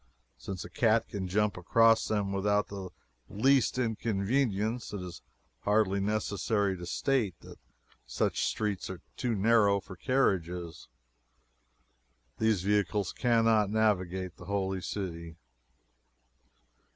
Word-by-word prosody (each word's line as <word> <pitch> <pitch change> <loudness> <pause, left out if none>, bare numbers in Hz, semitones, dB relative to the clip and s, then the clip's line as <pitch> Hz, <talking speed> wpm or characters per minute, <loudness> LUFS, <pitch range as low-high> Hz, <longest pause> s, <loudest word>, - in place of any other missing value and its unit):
Since 95 -3 -6
a - - -9
cat 115 +1 +2
can 95 -2 -4
jump 105 +2 0
across 115 +5 +4
them 100 -2 -1
without 105 +1 +1
the 95 -2 -6 0.4
least 130 +4 +2
inconvenience, 110 0 -1
it 100 - -3
is 90 -1 -8 0.4
hardly 100 - +2
necessary 100 0 0
to 85 -1 -8
state 110 -4 0
that - - -13 0.5
such - - 0
streets 105 -3 -2
are 95 -2 -7
too 120 -3 -1
narrow 100 -1 +4
for 95 0 -11
carriages. 90 - -1 1.5
These 110 -5 +2
vehicles 105 -1 0
cannot 115 -4 +3
navigate 95 -4 0
the - - -11
Holy 95 -2 -2
City. 85 -4 -5
100 Hz, 115 wpm, -30 LUFS, 95-110 Hz, 1.5 s, across